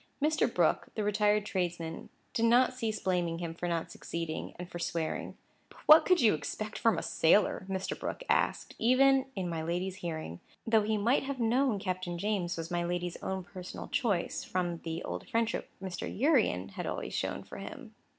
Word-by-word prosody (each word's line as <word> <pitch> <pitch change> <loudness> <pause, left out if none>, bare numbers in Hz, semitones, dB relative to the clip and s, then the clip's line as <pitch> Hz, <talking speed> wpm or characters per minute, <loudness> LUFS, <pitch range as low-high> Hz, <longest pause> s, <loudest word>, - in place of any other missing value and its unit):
Mr. 305 +1 +2
Brooke, - - +2
the 215 - -1
retired 210 0 +2
tradesman, 175 -4 -3 0.2
did 230 - +2
not 245 +3 +5
cease 225 -4 -2
blaming 175 -3 0
him 170 -1 -4
for 175 +1 -4
not 170 -1 -2
succeeding, 165 -1 -5
and 180 0 -6
for 175 - -7
swearing. 165 -2 -3 0.3
"But - - -18
what 310 +1 +9
could 365 -1 +5
you 220 - +6
expect 215 +7 -4
from 230 - +3
a - - -2
sailor?" 185 +2 +3
Mr. 190 0 -3
Brooke - - -4
asked, - - +1
even 265 +3 +5
in 185 -2 -2
my 165 -2 -2
lady's 180 +3 -2
hearing; 160 - -5 0.3
though 225 -1 +4
he 215 +1 0
might 235 +7 +2
have 275 -1 -4
known 240 0 +2
Captain 185 -2 -3
James 185 -3 -1
was 165 +1 -5
my 175 0 0
lady's 175 0 -2
own 190 -1 -3
personal 180 0 -8
choice, 205 -10 0
from 175 -2 -2
the 165 +1 -4
old - - -5
friendship 230 -2 0
Mr. 185 -2 -4
Urian 225 - +2
had - - -5
always - - -4
shown - - -2
for - - -10
him. - - -9
190 Hz, 185 wpm, -31 LUFS, 170-225 Hz, 0.3 s, what